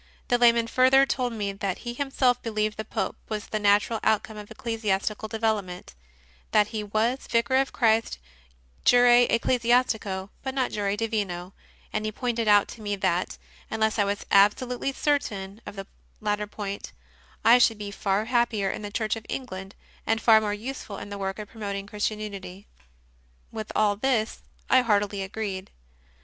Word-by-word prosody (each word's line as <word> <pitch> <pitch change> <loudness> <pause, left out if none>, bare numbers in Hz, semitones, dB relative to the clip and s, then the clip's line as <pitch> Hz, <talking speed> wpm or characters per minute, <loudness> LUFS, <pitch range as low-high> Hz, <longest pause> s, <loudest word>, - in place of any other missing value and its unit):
The 245 - +3
layman 235 -1 +5
further 260 +3 +5
told 250 -2 -1
me 205 -3 -2
that 195 -2 -3
he 240 - -3
himself 260 -2 +1
believed 215 -2 -1
that 220 0 -6
the - - -34
Pope - - -1
was 215 -1 -3
the 215 - -3
natural 205 +2 +3
outcome 220 0 +1
of 210 -1 -9
ecclesi 225 0 -5
astical 210 +3 -1
development; 215 - -2 0.6
that 210 0 +3
he 215 -2 -3
was 220 +5 -1
Vicar 235 +3 +2
of 270 0 +1
Christ 225 - +2 0.7
jure 245 0 +6 0.2
ecclesiastico, 230 -5 +1
but 265 0 -4
not 260 -2 0
jure 200 -1 -1
divino; 200 -5 -2 0.4
and 215 - -1
he 215 - -2
pointed 235 -1 -2
out 205 -1 +5
to 230 - -10
me 205 -1 -2
that, 180 -2 -1 0.3
unless 220 0 0
I - - +5
was 200 +1 -2
absolutely 240 +6 +3
certain 215 -9 -2
of - - -7
the 195 0 -6 0.3
latter 210 0 -1
point, 200 -1 -6 0.5
I 235 +2 +8
should 225 -2 +4
be 205 -1 -6
far 200 +1 0
happier 235 -5 +1
in - - -6
the 205 - -5
Church 215 0 -1
of 225 -1 -10
England 195 -7 -6 0.3
and 225 +1 +2
far 220 -1 +6
more 210 -1 -1
useful 210 -1 -6
in 205 - -8
the 200 0 -6
work 195 0 -3
of 210 -1 -7
promoting 200 -3 -5
Christian 210 +1 -2
unity. 200 -2 -7 0.9
With 220 -1 -6
all 210 -1 +3
this 225 -1 0 0.3
I 260 - +5
heartily 205 -3 +1
agreed. 195 -1 -4
215 Hz, 170 wpm, -26 LUFS, 200-235 Hz, 0.9 s, I